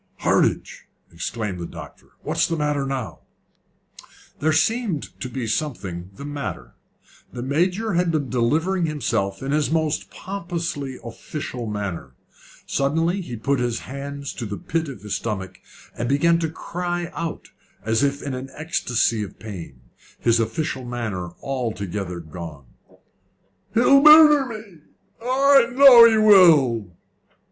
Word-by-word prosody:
"Hardinge!" -, -, 0 dB, 0.3 s
exclaimed 95 Hz, +2 st, -4 dB
the 85 Hz, -, -5 dB
doctor; -, -, -12 dB
"what's -, -, 0 dB
the 165 Hz, -, -2 dB
matter 150 Hz, -3 st, -1 dB
now?" 130 Hz, -4 st, -4 dB, 1.2 s
There 155 Hz, +2 st, +2 dB
seemed 200 Hz, -, 0 dB
to 125 Hz, -, -5 dB
be 125 Hz, -1 st, -4 dB
something 105 Hz, -, -3 dB
the 140 Hz, -, -9 dB
matter. 95 Hz, -, -6 dB, 0.6 s
The 120 Hz, -, -6 dB
Major 180 Hz, -, 0 dB
had 175 Hz, 0 st, +1 dB
been 155 Hz, -4 st, -1 dB
delivering 160 Hz, +9 st, 0 dB
himself 110 Hz, -9 st, -2 dB
in 135 Hz, -, -3 dB
his 150 Hz, -3 st, +1 dB
most 160 Hz, -1 st, -1 dB
pompously 170 Hz, -8 st, -5 dB
official 120 Hz, 0 st, -6 dB
manner. 95 Hz, -11 st, -5 dB, 0.5 s
Suddenly 165 Hz, +7 st, 0 dB
he 125 Hz, -9 st, -7 dB
put 135 Hz, +4 st, -1 dB
his 120 Hz, -2 st, -1 dB
hands 140 Hz, +1 st, -7 dB
to 120 Hz, -, -6 dB
the 100 Hz, 0 st, -5 dB
pit 165 Hz, 0 st, -2 dB
of 130 Hz, -, -10 dB
his 105 Hz, -, -4 dB
stomach, 95 Hz, -4 st, -5 dB, 0.4 s
and 120 Hz, -, -3 dB
began 165 Hz, +5 st, +3 dB
to 165 Hz, -1 st, -1 dB
cry 175 Hz, +1 st, -4 dB
out 165 Hz, -1 st, -5 dB, 0.3 s
as 110 Hz, +2 st, +1 dB
if 140 Hz, 0 st, 0 dB
in 140 Hz, -, -4 dB
an 130 Hz, +1 st, -6 dB
ecstacy 120 Hz, -8 st, 0 dB
of 105 Hz, -, -7 dB
pain, 90 Hz, -, -9 dB, 0.4 s
his 115 Hz, 0 st, +2 dB
official 130 Hz, +4 st, -2 dB
manner 110 Hz, -8 st, -4 dB
altogether 100 Hz, -8 st, -4 dB
gone. 80 Hz, -3 st, -9 dB, 1.1 s
"He'll 275 Hz, +4 st, +6 dB
murder 300 Hz, -2 st, +8 dB
me! 215 Hz, -7 st, -10 dB, 0.4 s
I 270 Hz, +1 st, +4 dB
know 250 Hz, -3 st, +9 dB
he 220 Hz, -, +2 dB
will!" 150 Hz, -, +5 dB
140 Hz, 135 wpm, -22 LUFS, 110-170 Hz, 1.2 s, know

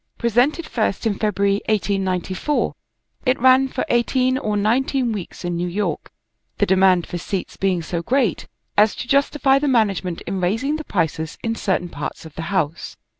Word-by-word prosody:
Presented 245 Hz, +8 st, +2 dB
first 220 Hz, -5 st, -1 dB
in 220 Hz, -, +2 dB
February, 200 Hz, -1 st, 0 dB
1894, 195 Hz, +4 st, 0 dB, 0.5 s
it 255 Hz, -, +3 dB
ran 260 Hz, +2 st, +5 dB
for 255 Hz, -, -3 dB
eighteen 255 Hz, +2 st, +2 dB
or 215 Hz, -6 st, -1 dB
nineteen 245 Hz, +4 st, +1 dB
weeks 195 Hz, -3 st, -6 dB
in 175 Hz, 0 st, -1 dB
New 175 Hz, +1 st, -1 dB
York, 180 Hz, -3 st, -2 dB, 0.5 s
the -, -, +3 dB
demand 185 Hz, -1 st, +4 dB
for 175 Hz, -, -5 dB
seats 190 Hz, +2 st, -4 dB
being 185 Hz, -3 st, 0 dB
so 170 Hz, +1 st, -3 dB
great 245 Hz, 0 st, 0 dB, 0.3 s
as 210 Hz, +1 st, +4 dB
to -, -, -6 dB
justify 275 Hz, 0 st, +3 dB
the 295 Hz, -, -1 dB
management 200 Hz, -8 st, +1 dB
in 190 Hz, +1 st, -4 dB
raising 225 Hz, +12 st, 0 dB
the 310 Hz, -, -6 dB
prices 160 Hz, -, -2 dB
in 225 Hz, -1 st, 0 dB
certain 190 Hz, -5 st, -1 dB
parts 145 Hz, +2 st, -6 dB
of 160 Hz, -, -11 dB
the 165 Hz, -, -6 dB
house. 170 Hz, -4 st, -2 dB
205 Hz, 170 wpm, -21 LUFS, 180-255 Hz, 0.5 s, ran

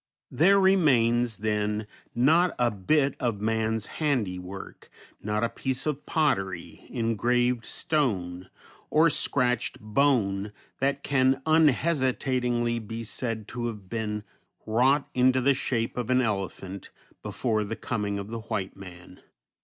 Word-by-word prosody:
There 195 Hz, +6 st, +5 dB
remains, 120 Hz, -, +3 dB
then, 105 Hz, 0 st, -1 dB, 0.3 s
not 160 Hz, +9 st, +3 dB
a 120 Hz, -1 st, +2 dB
bit 135 Hz, +8 st, +1 dB
of 115 Hz, -5 st, -1 dB
man's 110 Hz, 0 st, 0 dB, 0.2 s
handiwork, 95 Hz, -10 st, -3 dB, 0.3 s
not 105 Hz, +1 st, -1 dB
a -, -, +3 dB
piece 130 Hz, 0 st, -3 dB
of 150 Hz, -2 st, -3 dB
pottery, 95 Hz, -, -1 dB
engraved 120 Hz, +1 st, 0 dB
stone, 95 Hz, -, -1 dB, 0.4 s
or 160 Hz, +1 st, +4 dB
scratched 125 Hz, -4 st, +1 dB
bone 105 Hz, -4 st, +1 dB, 0.3 s
that 140 Hz, +1 st, 0 dB
can 135 Hz, -1 st, +2 dB
unhesitatingly 130 Hz, -6 st, +2 dB
be 115 Hz, +1 st, -6 dB
said 115 Hz, -1 st, -4 dB
to 120 Hz, -1 st, -3 dB
have 105 Hz, -5 st, -7 dB
been 105 Hz, -1 st, -3 dB, 0.4 s
wrought 130 Hz, +6 st, +2 dB
into 130 Hz, +1 st, +3 dB
the 140 Hz, +2 st, +3 dB
shape 120 Hz, -3 st, -2 dB
of 125 Hz, -2 st, -3 dB
an 130 Hz, 0 st, +4 dB
elephant 100 Hz, -4 st, -3 dB, 0.3 s
before 110 Hz, -4 st, -1 dB
the 105 Hz, +2 st, -4 dB
coming 105 Hz, -5 st, -3 dB
of 100 Hz, +1 st, -6 dB
the 115 Hz, -, -4 dB
white 100 Hz, -3 st, -4 dB
man. 90 Hz, -1 st, -12 dB
120 Hz, 125 wpm, -27 LUFS, 105-135 Hz, 0.4 s, There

